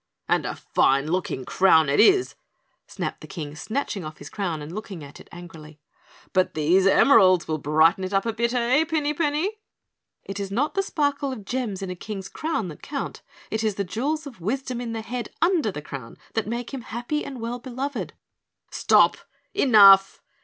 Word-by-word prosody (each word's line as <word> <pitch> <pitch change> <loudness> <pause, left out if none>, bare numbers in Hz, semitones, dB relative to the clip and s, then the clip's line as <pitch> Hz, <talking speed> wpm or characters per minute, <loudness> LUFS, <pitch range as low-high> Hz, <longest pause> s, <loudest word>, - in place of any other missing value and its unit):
"And - - +1
a - - -4
fine 140 +3 +1
looking 170 -8 -2
crown 160 -5 +4
it 140 - +1
is," 385 -1 +5 0.5
snapped - - -5
the - - -10
King, 150 -5 -7
snatching 215 - -3
off 155 0 -8
his - - -11
crown 180 -6 -3
and 150 +3 -8
looking 195 -5 -7
at 140 0 -12
it - - -15
angrily. 160 -3 -12 0.5
"But 185 -1 +1
these 175 +5 +3
emeralds 190 -5 +5
will 155 -1 -2
brighten 155 +6 +3
it 185 - -3
up 195 +1 +1
a 230 - -1
bit, 235 +1 0
eh, 250 +4 +2
Pinny 305 -2 -1
Penny?" 325 +7 -1 0.6
"It 195 0 -6
is 200 -1 -4
not 255 +10 0
the 390 - +1
sparkle 285 -6 -1
of 220 -6 -8
gems 220 -5 -3
in 185 - -4
a - - -5
King's 195 +1 -7
crown 310 - -3
that 150 - -11
count, 280 -2 -5 0.3
it 220 0 -1
is 215 -3 0
the 200 - -1
jewels 280 - -2
of 245 -10 -11
wisdom 250 +5 -3
in 235 -2 -4
the 225 - -3
head 245 +1 -5
under 335 - +2
the 150 -5 -7
crown 135 -6 -9 0.2
that 225 -2 -1
make 235 +3 -4
him 265 - -4
happy 240 +6 -4
and 270 -3 -7
well 235 +2 -4
beloved 260 +3 -5 0.3
" - - -50
"Stop! - - +4 0.4
Enough!" 195 -6 +6
215 Hz, 195 wpm, -24 LUFS, 180-265 Hz, 0.6 s, Enough